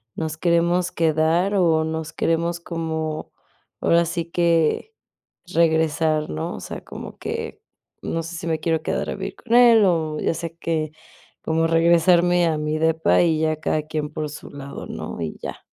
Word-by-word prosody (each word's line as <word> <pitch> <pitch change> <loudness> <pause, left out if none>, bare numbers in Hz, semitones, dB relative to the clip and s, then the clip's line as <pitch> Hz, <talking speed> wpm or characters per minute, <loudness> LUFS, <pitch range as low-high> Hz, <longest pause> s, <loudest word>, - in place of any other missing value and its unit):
nos 160 -1 -3
queremos 170 +1 +2
quedar 165 +4 +2
o 165 -4 +3
nos 160 0 -4
queremos 170 +1 0
como 160 -2 -4 0.5
ahora 170 0 +4
sí 170 0 -3
que 170 - +1 0.6
regresar, 160 -2 +2
¿no? 80 +1 -3
O - - -7
sea, - - -7
como - - -9
que - - -5 0.4
no 165 - -2
sé 165 +2 -7
si 165 - -6
me 160 -1 0
quiero 160 0 0
quedar - - -2
a - - -3
vivir 195 0 -5
con 235 0 -1
él, 235 -3 +7
o 160 -4 0
ya - - 0
sé 165 0 -6
que 155 -2 -2 0.5
como 160 0 +1
regresarme 170 +1 +4
a 160 -2 0
mi 150 +1 -1
depa, 160 +1 +3
y 160 -2 +2
ya 155 0 +1
cada 155 0 0
quien 155 -1 -3
por 155 -1 -3
su 150 - -10
lado, 140 -1 -8
¿no? - - -6
Y 80 - -4
ya. - - -7
165 Hz, 170 wpm, -22 LUFS, 155-170 Hz, 0.6 s, él